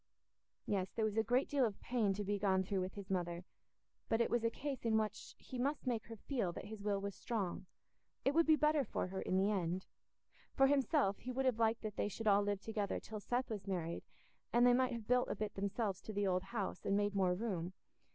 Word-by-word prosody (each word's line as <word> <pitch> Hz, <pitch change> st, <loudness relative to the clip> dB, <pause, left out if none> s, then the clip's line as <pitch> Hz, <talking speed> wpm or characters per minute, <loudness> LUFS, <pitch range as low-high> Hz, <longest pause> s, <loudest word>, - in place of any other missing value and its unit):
Yes, 190 Hz, -2 st, 0 dB
there 220 Hz, -, +1 dB
was 215 Hz, -1 st, -1 dB
a 220 Hz, -, +4 dB
great 245 Hz, +4 st, +2 dB
deal 280 Hz, -2 st, +2 dB
of 215 Hz, -5 st, 0 dB
pain 230 Hz, -5 st, +1 dB
to 205 Hz, -, -2 dB
be 205 Hz, 0 st, -1 dB
gone 190 Hz, -1 st, +3 dB
through 195 Hz, 0 st, -1 dB
with 185 Hz, +1 st, -4 dB
his 200 Hz, -2 st, -7 dB
mother, 175 Hz, -1 st, -1 dB, 0.7 s
but 225 Hz, -, +2 dB
it 235 Hz, -, +2 dB
was 240 Hz, -1 st, +2 dB
a 230 Hz, -, +3 dB
case 275 Hz, +2 st, -4 dB
in 225 Hz, -1 st, +3 dB
which 215 Hz, -1 st, -3 dB
he 255 Hz, -, -7 dB
must 280 Hz, +4 st, 0 dB
make 235 Hz, -4 st, -1 dB
her 230 Hz, -, -7 dB
feel 225 Hz, -4 st, -1 dB
that -, -, -7 dB
his 210 Hz, 0 st, -7 dB
will 200 Hz, -1 st, 0 dB
was 200 Hz, 0 st, -4 dB
strong—it 205 Hz, +6 st, -4 dB
would 330 Hz, +1 st, +4 dB
be 315 Hz, -, +7 dB
better 300 Hz, -1 st, +3 dB
for -, -, -2 dB
her 190 Hz, 0 st, -3 dB
in 185 Hz, -, 0 dB
the 195 Hz, +2 st, +3 dB
end. 185 Hz, -2 st, -1 dB, 0.7 s
For 270 Hz, -, +6 dB
himself, 275 Hz, -6 st, +3 dB
he 255 Hz, -, -5 dB
would 265 Hz, +1 st, -1 dB
have 250 Hz, -3 st, +2 dB
liked 225 Hz, 0 st, +2 dB
that 215 Hz, -2 st, -4 dB
they -, -, +1 dB
should 220 Hz, +2 st, -6 dB
all 205 Hz, -1 st, +6 dB
live 205 Hz, -1 st, -1 dB
together 215 Hz, -3 st, -2 dB
till 215 Hz, -1 st, -7 dB
Seth 245 Hz, +4 st, -1 dB
was 205 Hz, -2 st, -4 dB
married, 170 Hz, -3 st, -2 dB, 0.5 s
and 240 Hz, +1 st, +5 dB
they 245 Hz, -, +7 dB
might 255 Hz, 0 st, +3 dB
have 230 Hz, -3 st, -6 dB
built 250 Hz, 0 st, +3 dB
a -, -, -1 dB
bit 210 Hz, -1 st, -3 dB
themselves 200 Hz, 0 st, -1 dB
to 215 Hz, -, -7 dB
the 205 Hz, 0 st, +1 dB
old 185 Hz, -1 st, +1 dB
house, 195 Hz, -3 st, -3 dB
and 200 Hz, -, +2 dB
made 205 Hz, 0 st, +1 dB
more 185 Hz, -3 st, +2 dB
room. 185 Hz, -4 st, -2 dB
210 Hz, 240 wpm, -37 LUFS, 195-240 Hz, 0.7 s, be